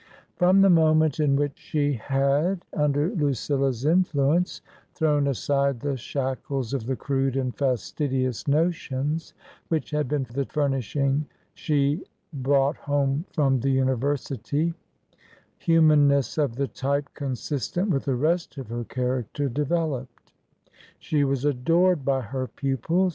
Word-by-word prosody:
From 185 Hz, +2 st, +4 dB
the 195 Hz, -, +6 dB
moment 155 Hz, -2 st, +4 dB
in 145 Hz, -2 st, +3 dB
which 145 Hz, 0 st, -1 dB
she 145 Hz, -1 st, 0 dB
had, 140 Hz, -, 0 dB
under 150 Hz, +3 st, +1 dB
Lucilla's 140 Hz, -, 0 dB
in 175 Hz, +5 st, +5 dB
fluence, 155 Hz, +2 st, 0 dB, 0.3 s
thrown 150 Hz, -3 st, +2 dB
aside 140 Hz, 0 st, 0 dB
the 140 Hz, +2 st, -2 dB
shackles 130 Hz, 0 st, -3 dB
of 125 Hz, -4 st, -3 dB
the 130 Hz, -, 0 dB
crude 135 Hz, 0 st, -1 dB
and 130 Hz, -2 st, -2 dB
fastidious 130 Hz, 0 st, -1 dB
notions 150 Hz, -1 st, -1 dB, 0.3 s
which 160 Hz, -2 st, -2 dB
had 150 Hz, -2 st, 0 dB
been 145 Hz, 0 st, -1 dB
the 140 Hz, +1 st, -1 dB
furnishing 140 Hz, 0 st, 0 dB, 0.3 s
she 145 Hz, +2 st, 0 dB, 0.3 s
brought 140 Hz, +1 st, +1 dB
home 145 Hz, +2 st, 0 dB
from 135 Hz, -4 st, +2 dB
the 135 Hz, -, 0 dB
University, 135 Hz, +4 st, 0 dB, 0.9 s
humanness 150 Hz, -4 st, +4 dB
of 140 Hz, -6 st, 0 dB
the 140 Hz, +2 st, -1 dB
type 140 Hz, +2 st, -2 dB
consistent 145 Hz, -, -2 dB
with 135 Hz, -, 0 dB
the 135 Hz, -3 st, +1 dB
rest 160 Hz, +4 st, 0 dB
of 130 Hz, -5 st, -7 dB
her 120 Hz, +1 st, -3 dB
character 130 Hz, +3 st, -2 dB
developed. 145 Hz, -2 st, -3 dB, 0.6 s
She 150 Hz, -2 st, 0 dB
was 135 Hz, -1 st, 0 dB
adored 165 Hz, +4 st, +2 dB
by 135 Hz, 0 st, +1 dB
her 130 Hz, +3 st, -4 dB
pupils. 145 Hz, +9 st, 0 dB
140 Hz, 130 wpm, -25 LUFS, 135-155 Hz, 0.9 s, the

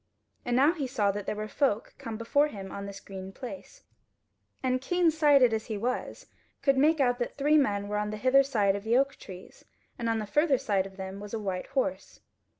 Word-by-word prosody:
And 245 Hz, -1 st, 0 dB
now 285 Hz, +6 st, +5 dB
he 290 Hz, -6 st, -3 dB
saw 215 Hz, -6 st, +1 dB
that 205 Hz, 0 st, -6 dB
there -, -, -1 dB
were 215 Hz, 0 st, -4 dB
folk 230 Hz, -3 st, 0 dB
come 230 Hz, -4 st, -6 dB
before 285 Hz, +6 st, +2 dB
him 195 Hz, -8 st, -8 dB
on 200 Hz, 0 st, -6 dB
this 200 Hz, 0 st, -8 dB
green 190 Hz, -1 st, -9 dB
place, 280 Hz, -, -10 dB, 0.8 s
and 255 Hz, 0 st, +1 dB
keen 350 Hz, +4 st, +2 dB
sighted 290 Hz, -6 st, +5 dB
as 220 Hz, -1 st, -2 dB
he 215 Hz, -, -3 dB
was, 245 Hz, +5 st, -3 dB, 0.4 s
could 275 Hz, -1 st, +4 dB
make 305 Hz, +4 st, +3 dB
out 245 Hz, -2 st, +2 dB
that 240 Hz, -, -3 dB
three 295 Hz, +2 st, +3 dB
men 205 Hz, -7 st, 0 dB
were 210 Hz, 0 st, -2 dB
on 210 Hz, 0 st, -2 dB
the 215 Hz, -, -4 dB
hither 260 Hz, +5 st, +5 dB
side 210 Hz, -8 st, +1 dB
of 200 Hz, -, -5 dB
the 230 Hz, +3 st, +2 dB
oak 275 Hz, +1 st, +1 dB
trees, 185 Hz, -1 st, -12 dB, 0.4 s
and 230 Hz, -1 st, -1 dB
on 225 Hz, -, +1 dB
the 215 Hz, -, -3 dB
further 295 Hz, +6 st, +2 dB
side 200 Hz, -7 st, 0 dB
of 190 Hz, 0 st, -16 dB
them 190 Hz, 0 st, -6 dB
was 205 Hz, +2 st, -6 dB
a -, -, -3 dB
white 190 Hz, -3 st, -3 dB
horse. 275 Hz, +1 st, -3 dB
235 Hz, 225 wpm, -28 LUFS, 205-275 Hz, 0.8 s, now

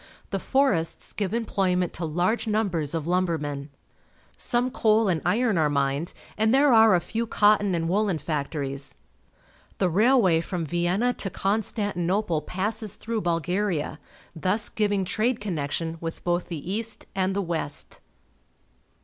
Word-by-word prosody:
The -, -, -1 dB
forests 265 Hz, -12 st, 0 dB
give 200 Hz, -3 st, -1 dB
emploj'ment 190 Hz, -5 st, 0 dB
to 170 Hz, -, -4 dB
large 180 Hz, +9 st, 0 dB
numbers 180 Hz, -9 st, 0 dB
of 160 Hz, -2 st, -2 dB
lumbermen. 160 Hz, -5 st, -1 dB, 0.7 s
Some 245 Hz, +1 st, 0 dB
coal 220 Hz, -3 st, +3 dB
and 170 Hz, -4 st, +1 dB
iron 215 Hz, +1 st, +2 dB
are 155 Hz, -2 st, +3 dB
mined, 140 Hz, +3 st, 0 dB, 0.3 s
and 220 Hz, 0 st, +3 dB
there 275 Hz, +1 st, +5 dB
are 220 Hz, -3 st, +7 dB
a -, -, +3 dB
few 225 Hz, +6 st, -3 dB
cotton 205 Hz, -3 st, +3 dB
and 165 Hz, -1 st, -1 dB
woollen 195 Hz, 0 st, +1 dB
factories. 140 Hz, -3 st, -3 dB, 0.8 s
The 185 Hz, -2 st, +1 dB
railway 205 Hz, -4 st, +4 dB
from 170 Hz, -1 st, -3 dB
Vienna 175 Hz, -, +1 dB
to 195 Hz, -, -4 dB
Constantinople 195 Hz, -3 st, -1 dB
passes 205 Hz, +5 st, -2 dB
through 225 Hz, -1 st, -3 dB
Bulgaria, 170 Hz, -2 st, -1 dB, 0.4 s
thus 185 Hz, +6 st, 0 dB
giving 205 Hz, -3 st, 0 dB
trade 225 Hz, +6 st, 0 dB
connection 165 Hz, -3 st, -3 dB
with 165 Hz, -1 st, -5 dB
both 175 Hz, 0 st, 0 dB
the 170 Hz, +1 st, -5 dB
east 225 Hz, +1 st, -1 dB
and 190 Hz, 0 st, 0 dB
the 200 Hz, -, +1 dB
west. 165 Hz, -4 st, -3 dB
185 Hz, 140 wpm, -26 LUFS, 165-215 Hz, 0.8 s, are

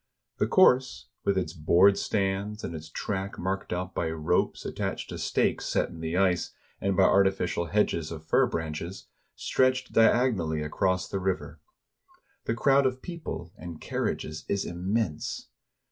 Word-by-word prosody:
The -, -, +2 dB
course 130 Hz, -9 st, +4 dB
— -, -, -54 dB
with 100 Hz, -1 st, +2 dB
its 95 Hz, -, -1 dB
board 90 Hz, +4 st, +5 dB
stands, 100 Hz, +1 st, -1 dB
and -, -, -4 dB
its 80 Hz, 0 st, -8 dB
track 95 Hz, +3 st, -4 dB
marked 95 Hz, +2 st, -3 dB
out 90 Hz, +1 st, -3 dB
by 80 Hz, -, -1 dB
ropes 80 Hz, -1 st, 0 dB
attached -, -, -3 dB
to -, -, -6 dB
stakes -, -, 0 dB
set -, -, +1 dB
in 85 Hz, -, -10 dB
the 80 Hz, +2 st, -2 dB
ice, 95 Hz, -2 st, +1 dB, 0.3 s
and 100 Hz, -1 st, 0 dB
by 95 Hz, -, +6 dB
artificial 95 Hz, -3 st, +2 dB
hedges 85 Hz, -4 st, 0 dB
of 80 Hz, -1 st, -7 dB
fir -, -, +3 dB
branches 80 Hz, +2 st, -5 dB, 0.2 s
— -, -, -45 dB
stretched 130 Hz, 0 st, +1 dB
diagonally 110 Hz, -9 st, +3 dB
across 95 Hz, +4 st, 0 dB
the 100 Hz, -, -3 dB
river. 95 Hz, 0 st, -2 dB, 0.9 s
The 115 Hz, -, 0 dB
crowd 135 Hz, +2 st, +4 dB
of 130 Hz, 0 st, -4 dB
people 160 Hz, -, -6 dB
and 85 Hz, -3 st, -8 dB
car -, -, -4 dB
riages 75 Hz, +1 st, -4 dB
is 100 Hz, -, 0 dB
immense. 90 Hz, -, -2 dB
95 Hz, 160 wpm, -28 LUFS, 85-105 Hz, 0.9 s, by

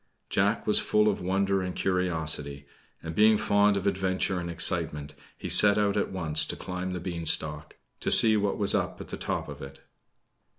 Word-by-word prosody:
Jack 100 Hz, +3 st, 0 dB
was 105 Hz, -, +4 dB
full 105 Hz, 0 st, +1 dB
of 105 Hz, -, -1 dB
wonder 95 Hz, +1 st, 0 dB
and 90 Hz, -1 st, -5 dB
curiosity; 80 Hz, -6 st, -2 dB, 0.4 s
and, 80 Hz, -, -6 dB
being 110 Hz, +3 st, +4 dB
fond 100 Hz, 0 st, +2 dB
of 100 Hz, -, -4 dB
adventure 95 Hz, -1 st, -1 dB
and 85 Hz, 0 st, -5 dB
excitement, 80 Hz, -3 st, 0 dB, 0.2 s
he -, -, -7 dB
set 105 Hz, 0 st, +5 dB
out 105 Hz, -1 st, +1 dB
at 105 Hz, -, -1 dB
once 80 Hz, -5 st, 0 dB
to -, -, -4 dB
climb 90 Hz, 0 st, -6 dB
the 90 Hz, -, -4 dB
beanstalk, 80 Hz, -3 st, -1 dB, 0.2 s
to -, -, -2 dB
see 110 Hz, -1 st, +6 dB
what 100 Hz, -1 st, -1 dB
was 100 Hz, -1 st, +1 dB
up -, -, -2 dB
at -, -, -10 dB
the -, -, -5 dB
top -, -, -3 dB
of -, -, -10 dB
it. 70 Hz, 0 st, -11 dB
95 Hz, 185 wpm, -27 LUFS, 80-100 Hz, 0.4 s, see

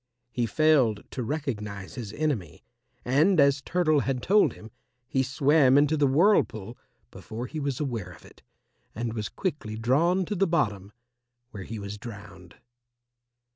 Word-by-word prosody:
He 120 Hz, 0 st, -1 dB
failed 130 Hz, -6 st, +3 dB
to 130 Hz, -, -4 dB
recognize 110 Hz, -8 st, -4 dB
his 115 Hz, -5 st, -6 dB
enemy, 120 Hz, -, -3 dB, 0.4 s
and 155 Hz, +9 st, +3 dB
as 140 Hz, -1 st, +4 dB
Turtle 155 Hz, -2 st, +1 dB
had 130 Hz, -2 st, -2 dB
told 210 Hz, +2 st, +4 dB
him, 110 Hz, 0 st, -13 dB, 0.4 s
he 130 Hz, -, 0 dB
swam 140 Hz, 0 st, +3 dB
into 145 Hz, +2 st, +3 dB
the 145 Hz, -2 st, +2 dB
whirlpool 135 Hz, -, +2 dB, 0.4 s
before 115 Hz, +3 st, -7 dB
he 155 Hz, -, -6 dB
was 140 Hz, -3 st, -2 dB
aware 120 Hz, -11 st, -3 dB
of 90 Hz, -, -14 dB
it, -, -, -18 dB, 0.5 s
and 115 Hz, 0 st, -3 dB
was 105 Hz, -3 st, -4 dB
quickly 145 Hz, -, -4 dB
drawn 165 Hz, +11 st, +2 dB
to 210 Hz, -, -3 dB
the 195 Hz, 0 st, +1 dB
bottom, 100 Hz, -, -1 dB, 0.6 s
where 100 Hz, -3 st, -8 dB
he 115 Hz, -, -6 dB
was 100 Hz, 0 st, -7 dB
drowned. 100 Hz, -6 st, -11 dB
130 Hz, 150 wpm, -26 LUFS, 110-155 Hz, 0.6 s, as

